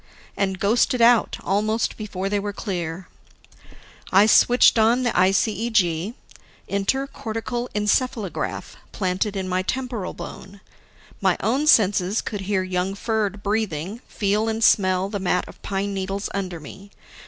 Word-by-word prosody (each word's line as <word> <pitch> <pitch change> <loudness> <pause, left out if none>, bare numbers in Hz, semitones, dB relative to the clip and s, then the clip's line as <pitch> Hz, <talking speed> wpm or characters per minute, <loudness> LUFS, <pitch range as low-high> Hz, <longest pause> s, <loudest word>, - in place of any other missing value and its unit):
and 190 -2 -1
ghosted 235 +5 +2
out 235 -1 +4
almost 215 +4 0
before 195 -3 -4
they 205 +1 0
were 205 +1 -3
clear. 180 -4 -5 1.0
I 195 +2 +6
switched 240 +1 +5
on 235 +3 +3
the 240 - +1
ICEG 195 0 +1 0.5
inter 200 +8 0
cortical 240 -2 -5
encephalograph 210 - -1
planted 190 +2 -1
in 190 -1 -3
my 185 0 0
temporal 245 -2 -4
bone. 195 +1 -9 0.6
My - - +2
own 270 +7 0
senses 205 -4 +4
could 205 -2 -4
hear 190 -2 +1
young 185 +1 -2
Ferd 210 -2 -2
breathing, 205 -2 -2
feel 210 +2 0
and 225 0 -2
smell 185 -3 +3
the 200 0 -4
mat 180 -1 0
of - - -14
pine 200 0 -2
needles 195 +1 -3
under 185 -4 -4
me. 195 +7 -12
200 Hz, 135 wpm, -23 LUFS, 190-225 Hz, 1.0 s, I